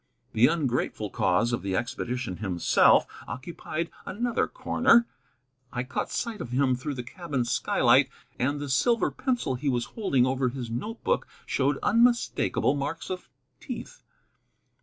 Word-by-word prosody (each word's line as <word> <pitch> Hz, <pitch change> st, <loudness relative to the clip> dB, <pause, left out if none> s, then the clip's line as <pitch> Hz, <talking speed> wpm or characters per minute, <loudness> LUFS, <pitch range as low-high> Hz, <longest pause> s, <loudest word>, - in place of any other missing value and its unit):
The 115 Hz, +3 st, +6 dB
ungrateful 125 Hz, -, -1 dB
cause 105 Hz, +7 st, +2 dB
of 120 Hz, -, -1 dB
the 95 Hz, -1 st, -2 dB
expedition 120 Hz, -2 st, -3 dB
himself 95 Hz, -5 st, +4 dB, 0.2 s
occupied 165 Hz, +4 st, -5 dB
another 235 Hz, +4 st, -1 dB
corner. 235 Hz, -, +3 dB, 0.7 s
I 125 Hz, -, -2 dB
caught 130 Hz, -, -3 dB
sight 230 Hz, -3 st, -3 dB
of 120 Hz, -, -5 dB
him 130 Hz, +1 st, +2 dB
through 140 Hz, +3 st, -4 dB
the 125 Hz, -, -4 dB
cabin 140 Hz, -2 st, -3 dB
skylight, 120 Hz, 0 st, +3 dB, 0.3 s
and 140 Hz, +4 st, 0 dB
the 145 Hz, -, -4 dB
silver 230 Hz, -, +2 dB
pencil 250 Hz, -, -1 dB
he 140 Hz, +3 st, -1 dB
was 120 Hz, -2 st, 0 dB
holding 140 Hz, -, +2 dB
over 130 Hz, 0 st, +1 dB
his 120 Hz, -2 st, -6 dB
note 215 Hz, -, -5 dB
book -, -, +1 dB, 0.2 s
showed -, -, +1 dB
unmistakable 235 Hz, -, +3 dB
marks 145 Hz, +5 st, -4 dB
of 185 Hz, -1 st, -6 dB, 0.3 s
teeth. -, -, -8 dB
130 Hz, 140 wpm, -27 LUFS, 120-180 Hz, 0.7 s, The